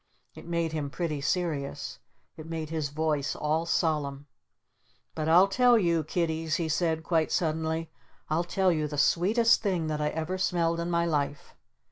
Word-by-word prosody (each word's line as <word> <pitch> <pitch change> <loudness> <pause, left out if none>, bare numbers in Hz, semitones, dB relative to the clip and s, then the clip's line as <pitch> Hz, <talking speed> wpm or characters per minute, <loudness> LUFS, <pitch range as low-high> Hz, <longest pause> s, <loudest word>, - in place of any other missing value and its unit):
It - - -12
made 170 -1 -1
him 150 -3 -3
pretty 155 -1 -3
serious. 150 -3 -2 0.4
It 155 - -10
made 160 -1 -5
his 155 -3 -2
voice 150 -1 -1
all 155 +2 -1
solemn. 145 -5 0 0.9
"But 155 0 -2
I'll 180 +4 +7
tell 245 +4 +4
you, 170 -5 +2
Kiddies," 160 0 -1
he 165 -1 -1
said 160 0 0
quite 160 -2 +1
suddenly. 160 0 -1 0.4
"I'll 160 +3 0
tell 185 +1 +1
you 155 -2 0
the 150 0 -6
Sweetest 215 - +3
Thing 185 -6 0
that 150 -1 -2
I 150 - +1
ever 160 +4 -3
smelled 170 -2 +1
in 170 +1 -2
my 170 0 +1
life! 145 -3 -2
160 Hz, 165 wpm, -28 LUFS, 155-170 Hz, 0.9 s, I'll